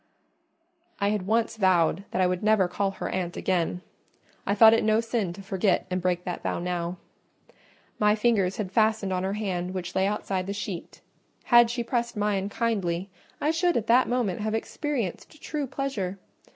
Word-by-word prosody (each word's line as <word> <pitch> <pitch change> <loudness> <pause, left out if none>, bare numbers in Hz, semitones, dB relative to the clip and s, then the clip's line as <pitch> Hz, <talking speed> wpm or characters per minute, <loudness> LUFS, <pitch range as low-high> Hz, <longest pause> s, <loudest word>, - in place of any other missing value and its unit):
I 200 - +2
had 205 -3 -2
once 225 +1 +1
vowed 185 -2 +2
that - - -3
I - - +4
would 180 0 0
never 215 -3 +3
call 195 +2 -1
her 195 - -5
aunt 180 -2 -3
again: 180 -1 0 0.7
I 200 - +2
thought 220 +1 +8
it 225 - +2
no 215 0 +3
sin 230 -5 -1
to 195 +2 -10
forget 195 -1 +1
and 185 0 -1
break 180 0 0
that 180 -1 -4
vow - - -2
now. 175 0 -3 1.0
My 210 0 +4
fingers 210 -4 +1
had 195 -4 -3
fastened 215 -2 +2
on 180 - 0
her 190 +1 -1
hand 185 -3 -3
which 180 -1 -4
lay 190 +1 +2
outside 195 -2 -2
the 200 - -2
sheet: 200 -4 -6 0.4
had 240 -1 +6
she 240 0 -2
pressed 235 -1 -2
mine 205 -1 0
kindly, 195 -5 -1 0.3
I 300 - +1
should 345 +2 +1
at 225 - -1
that 245 +3 +4
moment 240 -7 0
have 215 +1 -1
experienced 275 - -4
true 295 -3 -3
pleasure. 235 -9 -3
200 Hz, 180 wpm, -26 LUFS, 185-225 Hz, 1.0 s, thought